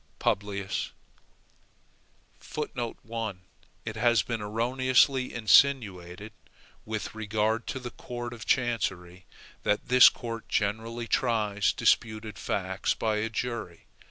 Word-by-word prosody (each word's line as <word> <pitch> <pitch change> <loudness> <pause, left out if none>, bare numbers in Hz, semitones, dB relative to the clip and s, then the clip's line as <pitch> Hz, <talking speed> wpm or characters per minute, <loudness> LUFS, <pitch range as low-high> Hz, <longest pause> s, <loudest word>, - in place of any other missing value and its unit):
PUBLIUS 100 -1 -2 1.6
1. 115 -7 -4 0.4
It 110 - -4
has 120 -1 +3
been 115 -2 -3
erroneously 130 +4 +2
insinuated 105 -5 +2 0.5
with 110 -1 -4
regard 110 +1 -1
to - - -3
the 125 -2 -6
court 120 0 -6
of 115 -1 -8
chancery, 95 -8 -1 0.3
that 105 - 0
this 125 0 +9
court 115 -2 -7
generally 115 +3 -1
tries 105 -6 +1
disputed 110 -2 0
facts - - -1
by 110 -1 0
a 110 +1 -1
jury. 115 -7 -4
110 Hz, 100 wpm, -28 LUFS, 105-120 Hz, 1.6 s, this